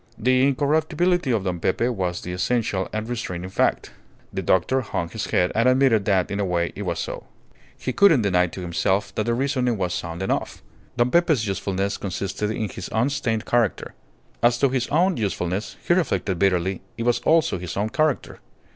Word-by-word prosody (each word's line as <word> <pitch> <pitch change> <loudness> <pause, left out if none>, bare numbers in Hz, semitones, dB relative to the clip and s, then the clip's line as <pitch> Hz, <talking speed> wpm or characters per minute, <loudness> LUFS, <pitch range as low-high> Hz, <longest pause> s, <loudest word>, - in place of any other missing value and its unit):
The 130 +3 +3
incorruptibility 155 +4 +1
of 115 -5 +1
Don 90 -2 -2
Pepe 115 +8 +1
was 90 -7 -2
the 90 - -5
essential 95 -1 -1
and 110 +1 -3
restraining 95 -7 -4
fact. - - 0 0.4
The - - -2
doctor 110 +9 +2
hung 85 -7 -3
his - - -4
head 90 - +1
and 115 +3 +3
admitted 130 -6 +3
that 95 -4 +1
in 100 - -2
a - - +1
way 85 -2 -1
it - - -6
was 85 -4 -2
so. - - -5 0.5
He 130 - -3
couldn't 165 - +5
deny 90 -2 +3
to 90 - -8
himself 95 +3 0
that 110 - -2
the 120 - +2
reasoning 125 -3 0
was 90 -2 -1
sound 85 +1 -4
enough. - - -2 0.3
Don 120 +1 +2
Pepe's 160 -9 +3
usefulness 100 0 -2
consisted 100 +2 -3
in 110 0 -2
his 95 - -7
unstained 115 -2 0
character. 120 -4 0 0.5
As 120 0 +4
to 140 +2 +3
his 125 -2 -1
own 175 +4 +2
usefulness, 95 -2 -2
he - - +5
reflected 105 - 0
bitterly 95 -1 +1 0.2
it 115 - -3
was 120 0 +2
also 160 - +2
his 90 +1 -6
own 105 +2 0
character. 155 +2 -1
110 Hz, 185 wpm, -23 LUFS, 95-130 Hz, 0.5 s, couldn't